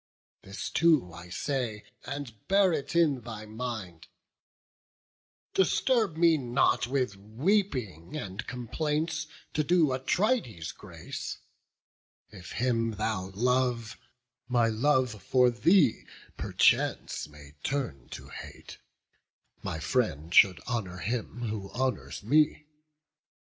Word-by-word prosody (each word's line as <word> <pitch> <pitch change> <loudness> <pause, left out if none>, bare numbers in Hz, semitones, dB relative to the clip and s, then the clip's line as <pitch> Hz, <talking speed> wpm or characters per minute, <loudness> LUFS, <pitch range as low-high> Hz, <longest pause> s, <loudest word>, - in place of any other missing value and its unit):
This 95 +1 -6
too 155 - +3
I 85 +1 -10
say, 120 -1 -2 0.2
and 140 -5 -5
bear 195 -2 +4
it 150 +2 -3
in 150 -7 +3
thy 110 -2 -7
mind: 110 -7 -6 1.5
Disturb 210 - +2
me 165 -2 +5
not 120 -1 +2
with 125 -5 0
weeping 125 - -1
and 100 -6 -6
complaints, 155 +6 -2 0.3
To 155 - +1
do 160 -3 +3
Atrides 130 - 0
grace; - - -7 0.9
if 90 -3 -10
him 115 -2 +1
thou 105 -3 -2
love, 125 0 +1 0.5
My 120 -2 +3
love 125 -2 +1
for 125 +5 +4
thee 150 - +3 0.3
perchance - - +1
may 75 -1 -14
turn 125 - -3
to - - -9
hate: - - -10 0.8
My - - -3
friend 85 - -1
should 95 -1 +7
honour 105 -7 -3
him 120 +4 -3
who 105 -4 -4
honours 130 -4 -2
me. 150 +5 +3
125 Hz, 110 wpm, -29 LUFS, 105-150 Hz, 1.5 s, should